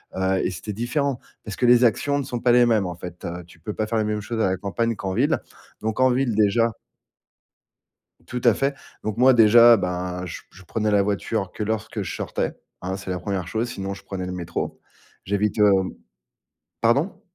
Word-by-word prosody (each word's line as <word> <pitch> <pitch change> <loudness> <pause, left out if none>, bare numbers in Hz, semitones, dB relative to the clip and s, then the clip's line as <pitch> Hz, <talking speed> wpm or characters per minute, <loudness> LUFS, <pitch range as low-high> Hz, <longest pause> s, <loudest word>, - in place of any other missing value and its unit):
heu, 95 0 +1
et - - +1
c'était 105 +3 -6
différent, 125 +4 -1 0.2
parce 105 -3 -7
que 125 - +1
les 120 0 +6
actions 140 +5 +2
ne 140 - -1
sont 125 -2 -4
pas 120 0 +3
les 120 0 +6
mêmes 110 -5 +2
en 90 -1 -4
fait, 90 0 -9
heu. 90 +1 -5
Tu 85 -1 -19
peux 105 +6 -5
pas 110 - -2
faire 115 - -1
les 110 - +1
mêmes 105 0 -1
choses 110 +2 -4
à - - +3
la 95 - -1
campagne 115 +4 -1
qu'en 95 -1 -4
ville. - - +2 0.4
Donc, 110 +2 -2
en 130 0 +5
ville 125 -1 +1
déjà 110 +2 +3 1.6
Tout 125 -1 -4
à 120 -3 +6
fait. 135 +4 0 0.3
Donc, 110 0 -3
moi 130 +1 +6
déjà, 115 0 +7
ben 90 -1 -3
je 90 - -7
p - - -33
je 95 - -15
prenais 105 +4 -1
la 100 -1 +4
voiture 100 0 -2
que 105 - -4
lorsque 110 0 -3
je 85 - -5
sortais, - - -2 0.3
hein. 95 +1 -3
C'est 95 -1 -8
la 90 - -2
1re 95 -4 -3
chose, 115 +4 -2
sinon, 100 -3 -4
je - - -12
prenais 95 -2 -5
le 90 - -4
métro. 85 -2 -4 0.5
J'évite, 100 +3 0
hem 95 -3 +4 0.9
pardon? 140 - +1
105 Hz, 215 wpm, -23 LUFS, 95-120 Hz, 1.6 s, déjà